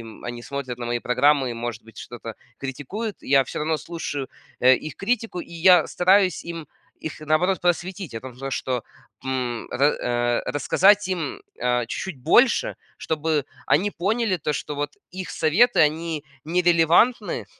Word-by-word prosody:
м, 115 Hz, -1 st, -12 dB
они 120 Hz, 0 st, -6 dB
смотрят 130 Hz, -2 st, -5 dB
на 120 Hz, -, -4 dB
мои 120 Hz, 0 st, 0 dB
программы 135 Hz, +4 st, +3 dB
и, -, -, -3 dB
может 115 Hz, -1 st, -5 dB
быть, 115 Hz, -1 st, -15 dB
что-то 115 Hz, -2 st, -8 dB, 0.2 s
критикуют, 145 Hz, -, -5 dB
я 135 Hz, 0 st, +4 dB
всё -, -, -6 dB
равно 155 Hz, +1 st, 0 dB
слушаю, 145 Hz, -4 st, -5 dB, 0.3 s
э, 130 Hz, +1 st, +7 dB
их 155 Hz, +1 st, -8 dB
критику. 225 Hz, -3 st, -1 dB
И 170 Hz, -, -11 dB
я 180 Hz, +2 st, +5 dB
стараюсь 185 Hz, -1 st, +3 dB
им, 165 Hz, -2 st, -6 dB, 0.4 s
их, 160 Hz, -, -5 dB
наоборот, 155 Hz, +5 st, +1 dB
просветить. 175 Hz, -, -1 dB
О 115 Hz, -, -4 dB
том 130 Hz, +2 st, -7 dB
что, 125 Hz, -2 st, -2 dB, 0.4 s
м, 125 Hz, -3 st, -3 dB
ра 120 Hz, -3 st, +1 dB
рассказать 200 Hz, +7 st, +3 dB
им 170 Hz, -6 st, -3 dB, 0.2 s
о, 125 Hz, 0 st, +1 dB
чуть-чуть 165 Hz, +4 st, -5 dB
больше, 245 Hz, -, +3 dB, 0.2 s
чтобы 155 Hz, -2 st, -1 dB, 0.2 s
они 190 Hz, +8 st, +3 dB
поняли, 205 Hz, +2 st, 0 dB
то 150 Hz, -2 st, -2 dB
что 150 Hz, +1 st, -4 dB
вот 145 Hz, 0 st, -4 dB
их 185 Hz, 0 st, -6 dB
советы 195 Hz, +11 st, +3 dB
они 155 Hz, 0 st, +1 dB, 0.2 s
нерелевантны 175 Hz, +7 st, +3 dB
155 Hz, 155 wpm, -24 LUFS, 130-180 Hz, 0.4 s, э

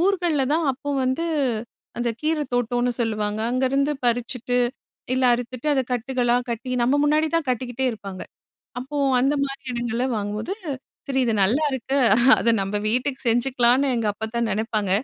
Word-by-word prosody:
ஊர்கள்ல 350 Hz, -7 st, +2 dB
தான் 325 Hz, +1 st, +2 dB
அப்போ 285 Hz, +3 st, -6 dB
வந்து 260 Hz, +6 st, 0 dB, 0.7 s
அந்த 240 Hz, 0 st, 0 dB
கீர 310 Hz, 0 st, 0 dB
தோட்டோன்னு 245 Hz, 0 st, +1 dB
சொல்லுவாங்க. 215 Hz, -2 st, -1 dB
அங்கருந்து 270 Hz, +3 st, +1 dB
பறிச்சுட்டு, 245 Hz, +1 st, 0 dB, 0.6 s
இல்ல 260 Hz, 0 st, +1 dB
அறுத்துட்டு, 245 Hz, +3 st, -4 dB
அத 265 Hz, -, +2 dB
கட்டுக்களா 245 Hz, 0 st, +1 dB
கட்டி 245 Hz, +2 st, -4 dB
நம்ம 280 Hz, +4 st, +3 dB
முன்னாடிதான் 310 Hz, 0 st, +1 dB
கட்டிக்கிட்டே 250 Hz, +1 st, -1 dB
இருப்பாங்க. 195 Hz, -3 st, -8 dB, 0.6 s
அப்போ 285 Hz, +3 st, -6 dB, 0.2 s
அந்தமாரி 275 Hz, 0 st, 0 dB
இடங்கள்ல 240 Hz, +1 st, -1 dB
வாங்கும்போது, 210 Hz, -, -3 dB, 0.5 s
சரி, 265 Hz, -1 st, +1 dB
இது 225 Hz, -, +1 dB
நல்லாயிருக்கு. 265 Hz, +3 st, +1 dB, 0.4 s
அத 230 Hz, -, +2 dB
நம்ம 195 Hz, +2 st, -2 dB
வீட்டுக்கு 255 Hz, +4 st, -1 dB
செஞ்சுக்கலான்னு 250 Hz, +2 st, +3 dB
எங்கள் 215 Hz, -3 st, 0 dB
அப்பத்தா 220 Hz, +3 st, -3 dB
நினைப்பாங்க. 215 Hz, -2 st, -1 dB
250 Hz, 130 wpm, -23 LUFS, 230-275 Hz, 0.7 s, நம்ம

